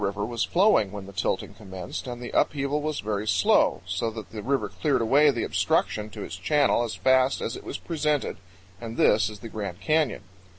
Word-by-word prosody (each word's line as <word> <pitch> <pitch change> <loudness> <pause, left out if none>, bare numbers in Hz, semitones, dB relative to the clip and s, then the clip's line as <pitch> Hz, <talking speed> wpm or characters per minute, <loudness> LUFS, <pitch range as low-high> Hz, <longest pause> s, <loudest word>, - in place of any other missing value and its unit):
jpg - - +1
River 100 +1 -2
was 115 0 -2
flowing 175 - +3
when 100 -1 -7
the 100 - -11
tilting - - -2
commenced, 95 +1 -7
and 120 -1 -5
the 120 -1 -7
upheaval 145 0 +1
was 155 0 -2
very 105 0 -2
slow, - - +3
so 115 - -1
that 110 -1 -9
the 110 - -6
river 135 +5 0
cleared 150 -3 0
away 140 +6 +5
the 120 -5 0
obstruction 105 0 0
to - - -7
its 90 - -7
channel 145 +7 +2
as 115 - -4
fast 130 0 +3
as 115 - -3
it - - -9
was - - -5
presented, 150 -3 -1 0.4
and 115 -1 -7
this 105 +1 +4
is 105 -2 -11
the 115 - -7
Grand 100 -5 -5
Canyon. 155 +8 +1
115 Hz, 210 wpm, -26 LUFS, 105-140 Hz, 0.4 s, away